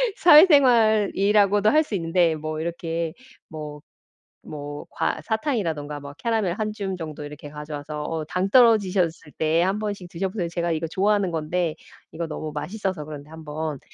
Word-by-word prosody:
사회생활이라고도 215 Hz, -, +5 dB
할 310 Hz, +5 st, +4 dB
수 295 Hz, -, -10 dB
있는데 165 Hz, -1 st, +2 dB
뭐 155 Hz, 0 st, -5 dB
이렇게 165 Hz, -1 st, -3 dB, 0.4 s
뭐 150 Hz, -1 st, -8 dB, 0.7 s
뭐 145 Hz, -1 st, -7 dB
과 -, -, -1 dB
사탕이라가 165 Hz, -, -2 dB
막 140 Hz, 0 st, -10 dB
캐러멜 225 Hz, -5 st, 0 dB
1 215 Hz, +4 st, -2 dB
줌 195 Hz, -3 st, -4 dB
정도 155 Hz, -3 st, -7 dB
이렇게 145 Hz, 0 st, -9 dB
가져와서 150 Hz, 0 st, -6 dB
어 160 Hz, 0 st, -3 dB
"당 185 Hz, +4 st, -1 dB
떨어지셨을 195 Hz, -, +3 dB
때 160 Hz, +2 st, +2 dB
1 190 Hz, +3 st, 0 dB
번씩 205 Hz, -4 st, -4 dB
드셔보세요." 185 Hz, +1 st, -3 dB
제가 170 Hz, 0 st, -2 dB
이거 160 Hz, 0 st, -1 dB
좋아하는 195 Hz, +2 st, +1 dB
건데 165 Hz, +1 st, -1 dB, 0.4 s
이거 165 Hz, +1 st, -4 dB
너무 155 Hz, 0 st, -5 dB
맛있어서 180 Hz, +2 st, -4 dB
그런데 150 Hz, -1 st, -9 dB
한번 155 Hz, -2 st, -5 dB
170 Hz, 330 characters per minute, -24 LUFS, 155-205 Hz, 0.7 s, 사회생활이라고도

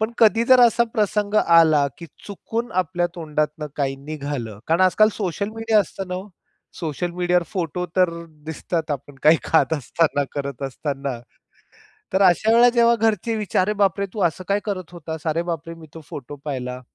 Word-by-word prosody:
पण 220 Hz, +1 st, 0 dB
कधी 225 Hz, +1 st, +5 dB
जर 255 Hz, +1 st, +6 dB
असा 235 Hz, 0 st, +5 dB
प्रसंग 210 Hz, 0 st, 0 dB
आला 160 Hz, -6 st, +5 dB
की 170 Hz, -, -9 dB, 0.2 s
चुकून 225 Hz, +4 st, -5 dB
आपल्या 175 Hz, 0 st, -1 dB
तोंडातनं 150 Hz, -2 st, -2 dB
काही 135 Hz, -2 st, -1 dB
निघालं. 140 Hz, -7 st, -6 dB
कारण 165 Hz, +3 st, +2 dB
आजकाल 185 Hz, +3 st, +5 dB
सोशल 200 Hz, 0 st, -3 dB
मीडिया 225 Hz, -1 st, +2 dB
असतं 195 Hz, +1 st, -5 dB
ना 180 Hz, -, -3 dB
हो. 190 Hz, +3 st, -6 dB, 0.5 s
सोशल 170 Hz, +1 st, -3 dB
मीडियावर 180 Hz, 0 st, +1 dB
फोटो 180 Hz, -1 st, -2 dB
तर 180 Hz, -2 st, +4 dB, 0.4 s
दिसतात 160 Hz, 0 st, -3 dB
आपण 145 Hz, 0 st, -5 dB
काही 155 Hz, +2 st, +6 dB
खात 160 Hz, 0 st, +2 dB
असताना, 145 Hz, 0 st, 0 dB
करत 140 Hz, -2 st, -5 dB
असताना. 135 Hz, -1 st, -4 dB, 0.9 s
तर 190 Hz, -, +3 dB
अशा 190 Hz, +4 st, +4 dB
वेळेला 235 Hz, +2 st, +6 dB
जेव्हा 235 Hz, -1 st, +4 dB
घरचे 225 Hz, 0 st, 0 dB
विचारतात, 205 Hz, -3 st, 0 dB
"अरे 210 Hz, -, +1 dB
बाप 200 Hz, -1 st, +2 dB
रे! 200 Hz, -, 0 dB
तू 210 Hz, -, -5 dB
असं 170 Hz, +2 st, -1 dB
काय 200 Hz, +1 st, +2 dB
करत 185 Hz, -5 st, -5 dB
होतास? 160 Hz, -2 st, -7 dB
अरे 160 Hz, +2 st, 0 dB
बाप 165 Hz, -2 st, -4 dB
रे! 165 Hz, -, -6 dB
मी 165 Hz, -1 st, -13 dB
तो 165 Hz, -, -9 dB
फोटो 145 Hz, +1 st, -8 dB
पाहिला." 125 Hz, -3 st, -4 dB
170 Hz, 180 wpm, -22 LUFS, 150-205 Hz, 0.9 s, जर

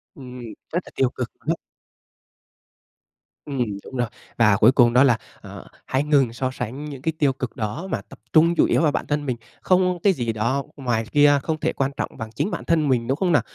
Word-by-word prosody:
Ừm. 125 Hz, -4 st, -10 dB, 0.3 s
Rất 175 Hz, -, +2 dB
là -, -, -13 dB
tiêu 130 Hz, -, +2 dB
cực 125 Hz, -2 st, -5 dB
luôn -, -, -7 dB
ấy! -, -, -6 dB, 1.9 s
Ừm, 135 Hz, -4 st, -1 dB, 0.2 s
đúng -, -, -10 dB
rồi. 120 Hz, -1 st, +1 dB, 0.3 s
Và 105 Hz, -4 st, +5 dB
cuối 115 Hz, +4 st, +6 dB
cùng 120 Hz, -3 st, +4 dB
đó 125 Hz, +2 st, +6 dB
là, 120 Hz, -5 st, +4 dB, 0.2 s
ờ, -, -, -10 dB, 0.2 s
hãy 135 Hz, +2 st, 0 dB
ngừng 140 Hz, -6 st, +2 dB
so 130 Hz, +2 st, -2 dB
sánh 130 Hz, +3 st, -5 dB
những 140 Hz, -3 st, -8 dB
cái 160 Hz, +3 st, -1 dB
tiêu 140 Hz, -3 st, +3 dB
cực 130 Hz, -2 st, -5 dB
đó 110 Hz, -, -4 dB
mà -, -, -1 dB
tập -, -, -16 dB
trung 165 Hz, +2 st, +5 dB
chủ -, -, +4 dB
yếu -, -, +2 dB
vào 155 Hz, -3 st, +3 dB
bản -, -, -2 dB
thân 145 Hz, 0 st, -1 dB
mình. 125 Hz, -3 st, -2 dB, 0.2 s
Không 180 Hz, -1 st, +2 dB
cái 200 Hz, -, +5 dB
gì 120 Hz, -7 st, -2 dB
đó 115 Hz, +6 st, 0 dB
ngoài 120 Hz, -5 st, -1 dB
kia 145 Hz, -1 st, +5 dB
không 160 Hz, -1 st, -2 dB
thể -, -, 0 dB
quan 135 Hz, 0 st, -1 dB
trọng -, -, -2 dB
bằng 115 Hz, -1 st, -6 dB
chính 205 Hz, -, -1 dB
bản -, -, -4 dB
thân 160 Hz, -3 st, +2 dB
mình, 120 Hz, -3 st, +1 dB
đúng 135 Hz, -, +1 dB
không 180 Hz, 0 st, +1 dB
nào? 155 Hz, -, +4 dB
135 Hz, 230 wpm, -23 LUFS, 120-150 Hz, 1.9 s, cuối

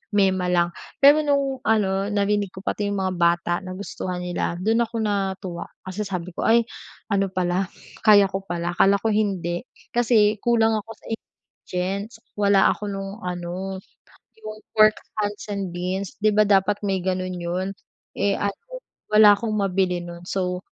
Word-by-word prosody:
mema 190 Hz, -2 st, +2 dB
lang. 175 Hz, -1 st, +1 dB, 0.2 s
Pero 290 Hz, +2 st, +7 dB
nung 275 Hz, -3 st, 0 dB
ano, 200 Hz, -2 st, +1 dB
narinig 205 Hz, -1 st, 0 dB
ko 190 Hz, -, -10 dB
pati 205 Hz, 0 st, -1 dB
yung 200 Hz, -, -1 dB
mga 185 Hz, -1 st, -1 dB
bata 170 Hz, 0 st, +2 dB
nagustuhan 185 Hz, -1 st, -5 dB
nila, 175 Hz, -1 st, -2 dB
dun 225 Hz, +5 st, +2 dB
ako 230 Hz, 0 st, -4 dB
natuwa. 190 Hz, -4 st, -2 dB, 0.2 s
Kasi 190 Hz, +3 st, -4 dB
sabi 180 Hz, -2 st, -4 dB
ko -, -, -3 dB
"Ay 230 Hz, +1 st, +5 dB, 0.5 s
ano 195 Hz, -1 st, +2 dB
pala, 185 Hz, 0 st, 0 dB, 0.4 s
kaya 205 Hz, -2 st, +7 dB
ko 195 Hz, -, -2 dB
pala, 175 Hz, 0 st, -2 dB
akala 195 Hz, +3 st, +5 dB
ko 225 Hz, -, +2 dB
hindi." 190 Hz, -5 st, 0 dB, 0.3 s
kasi 220 Hz, -3 st, +3 dB
kulang 230 Hz, -2 st, +3 dB
ako 210 Hz, +2 st, -13 dB
sa -, -, -22 dB
ingredients, 200 Hz, -1 st, -5 dB, 0.2 s
wala 200 Hz, -1 st, +5 dB
ako 210 Hz, -, -5 dB
nung 195 Hz, +1 st, -6 dB
ano, 180 Hz, +2 st, -4 dB, 0.6 s
yung 215 Hz, 0 st, -8 dB, 0.2 s
Pork 215 Hz, 0 st, +5 dB, 0.2 s
Hunts 205 Hz, -1 st, -2 dB
and 195 Hz, -3 st, -3 dB
beans. 185 Hz, +2 st, -3 dB
Di 215 Hz, -, +5 dB
ba 215 Hz, 0 st, +4 dB
dapat 200 Hz, 0 st, +3 dB
may 190 Hz, -2 st, 0 dB
ganun 185 Hz, 0 st, -2 dB
yun? 180 Hz, +3 st, -2 dB, 0.5 s
Eh 200 Hz, 0 st, +2 dB
ano, 200 Hz, 0 st, -1 dB, 0.6 s
wala 210 Hz, -1 st, +8 dB
akong 215 Hz, +1 st, -3 dB
mabili 190 Hz, -3 st, 0 dB
nun. 175 Hz, 0 st, -9 dB
So, 180 Hz, -1 st, -2 dB
195 Hz, 160 wpm, -23 LUFS, 185-210 Hz, 0.6 s, wala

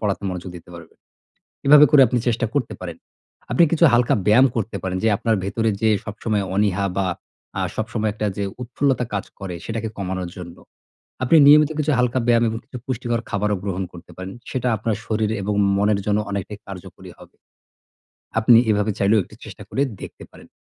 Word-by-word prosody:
পড়াতে 105 Hz, -2 st, -2 dB
মনোযোগ 90 Hz, 0 st, -6 dB
দিতে 85 Hz, -, -14 dB
পারবেন। 85 Hz, -1 st, -13 dB, 0.7 s
এভাবে 150 Hz, +1 st, +8 dB
করে 145 Hz, -3 st, +7 dB
আপনি 125 Hz, +2 st, 0 dB
চেষ্টা 120 Hz, 0 st, +1 dB
করতে 125 Hz, -6 st, -1 dB
পারেন। 85 Hz, -3 st, -6 dB, 0.5 s
আপনি 170 Hz, -, +4 dB
কিছু 165 Hz, 0 st, +2 dB
হালকা 120 Hz, 0 st, +3 dB
ব্যায়াম 115 Hz, +6 st, +6 dB
করতে 115 Hz, -1 st, -2 dB
পারেন 95 Hz, -1 st, -2 dB
যে -, -, +3 dB
আপনার 115 Hz, +1 st, +1 dB
ভেতরে 110 Hz, +3 st, 0 dB
যে 110 Hz, -, +3 dB, 0.2 s
সবসময় 105 Hz, -1 st, -2 dB
অনীহা 100 Hz, -1 st, +1 dB
বা 95 Hz, -1 st, +1 dB, 0.5 s
আ -, -, 0 dB
সবসময় 110 Hz, 0 st, -2 dB
একটা 110 Hz, 0 st, -3 dB
যে 100 Hz, -, -1 dB, 0.2 s
উৎফুল্লতা 130 Hz, +1 st, 0 dB
কাজ 100 Hz, -, -2 dB
করে 95 Hz, -3 st, -6 dB
সেটাকে 110 Hz, -1 st, -3 dB
কমানোর 95 Hz, -2 st, -4 dB
জন্য। 85 Hz, -1 st, -9 dB, 0.7 s
আপনি 130 Hz, +5 st, +3 dB
নিয়মিত 150 Hz, +1 st, +7 dB
কিছু 150 Hz, 0 st, +1 dB
হালকা 125 Hz, +1 st, +1 dB
ব্যায়াম 120 Hz, -1 st, +4 dB
এবং 110 Hz, -, -4 dB
কিছু 130 Hz, -, -9 dB
পুষ্টিকর 120 Hz, -2 st, -2 dB
খাবারও 105 Hz, 0 st, 0 dB
গ্রহণ 95 Hz, -2 st, -2 dB
করতে 85 Hz, -1 st, -13 dB
পারেন। 95 Hz, +1 st, -7 dB, 0.2 s
সেটা 125 Hz, -1 st, -2 dB
আপনার 110 Hz, +1 st, -1 dB
শরীর 110 Hz, -1 st, -1 dB
এবং 105 Hz, +2 st, -2 dB, 0.2 s
মনের 100 Hz, 0 st, +2 dB
জন্য 105 Hz, 0 st, +1 dB
অনেকটাই 100 Hz, +1 st, -5 dB
কার্যকরী 95 Hz, -2 st, -10 dB
হবে। -, -, -17 dB, 1.0 s
আপনি 115 Hz, +1 st, +6 dB
এভাবে 105 Hz, +1 st, +1 dB
চাইলেও 100 Hz, +2 st, +3 dB
একটু -, -, -16 dB
চেষ্টা -, -, -10 dB
করে 135 Hz, -, -1 dB, 0.2 s
দেখতে -, -, -9 dB
পারেন। -, -, -16 dB
110 Hz, 180 wpm, -21 LUFS, 100-120 Hz, 1.0 s, এভাবে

